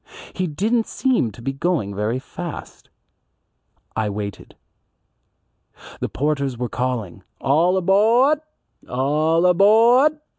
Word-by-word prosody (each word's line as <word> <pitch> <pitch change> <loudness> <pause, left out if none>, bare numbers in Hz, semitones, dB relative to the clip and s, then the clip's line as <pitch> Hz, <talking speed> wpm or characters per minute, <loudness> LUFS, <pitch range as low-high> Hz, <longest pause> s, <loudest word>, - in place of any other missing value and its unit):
He 185 -1 -2
didn't 220 +9 0
seem 255 - 0
going 135 - -3
very 105 +4 -2
fast. 165 +5 -9 1.1
I 110 -1 -1
waited. 100 -1 -7 1.4
The - - -3
porters 140 -2 -2
were 125 0 -3
calling, 120 -8 -3 0.2
"All 165 +7 +2
abawd! 230 - +3 0.5
All 150 +6 +1
abawd." 230 - +5
155 Hz, 90 wpm, -21 LUFS, 125-205 Hz, 1.4 s, abawd